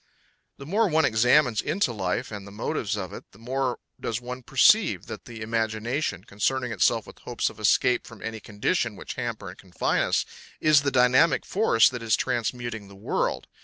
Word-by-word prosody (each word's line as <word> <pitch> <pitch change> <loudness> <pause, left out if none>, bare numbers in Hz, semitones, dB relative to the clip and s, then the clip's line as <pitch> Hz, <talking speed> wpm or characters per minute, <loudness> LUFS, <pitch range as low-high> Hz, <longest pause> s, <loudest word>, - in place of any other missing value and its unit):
The 140 - -10
more 210 +8 +2
one 160 -3 +3
examines 120 +1 +3
into 155 -7 0
life 100 +4 -2
and 100 -2 -7
the - - -11
motives 105 0 -2
of 95 -4 -5
it, - - -8
the - - -17
more 125 +2 -2 0.2
does 115 0 -3
one 125 +1 -7
perceive - - +4
that - - -8
the 115 -2 -8
imagination, 110 - -2
concerning 125 +5 -1
itself 105 - +2
with - - -14
hopes - - -2
of - - -17
escape 125 - +2
from 115 -3 -12
any 115 0 -5
conditions 110 - -1
which - - -7
hamper 115 -5 -5
and 90 - -12
confine 90 -2 -1
us, - - +1 0.3
is 155 -2 +5
the 145 - 0
dynamic 130 +3 +4
force 190 - +4
that 125 -2 -3
is 115 -1 +2
transmuting 120 -2 -3
the 100 - -14
world. 100 - -2
120 Hz, 185 wpm, -26 LUFS, 110-130 Hz, 0.3 s, is